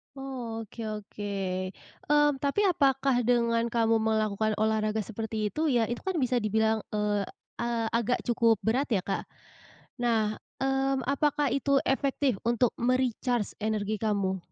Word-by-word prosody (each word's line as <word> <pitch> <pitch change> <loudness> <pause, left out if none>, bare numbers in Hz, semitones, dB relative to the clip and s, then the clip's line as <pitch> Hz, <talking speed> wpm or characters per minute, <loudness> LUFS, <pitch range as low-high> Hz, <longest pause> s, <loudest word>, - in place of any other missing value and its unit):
Oh, 250 -4 -5
oke 220 - -13 0.2
oke, 210 0 -7 0.8
mmm, 295 -1 +4
tapi 280 +8 0
apakah 270 -6 +2
dengan 235 -1 +2
kamu 230 -1 +2
melakukan 220 -1 +1
olahraga 215 0 +1
seperti 220 0 -3
itu 310 +8 -2
ya, 230 -2 +2
itu 240 - -5
kan 380 - 0
bisa 250 0 +2
dibilang, 220 0 +1
eee, 210 -1 0 0.3
a 235 -1 -1
agak 235 +2 0
cukup 230 -3 +2
berat 255 +6 +1
ya 190 - +2
Kak. 195 - -3 0.7
Nah, 220 -3 +1 0.2
mmm, 270 0 +1
apakah 280 +1 +1
itu 275 +1 +2
efektif 270 -3 0
untuk 240 0 +3
me-recharge 245 -2 0
energi 215 -1 -1
kamu? 200 -3 0
230 Hz, 135 wpm, -28 LUFS, 215-265 Hz, 0.8 s, mmm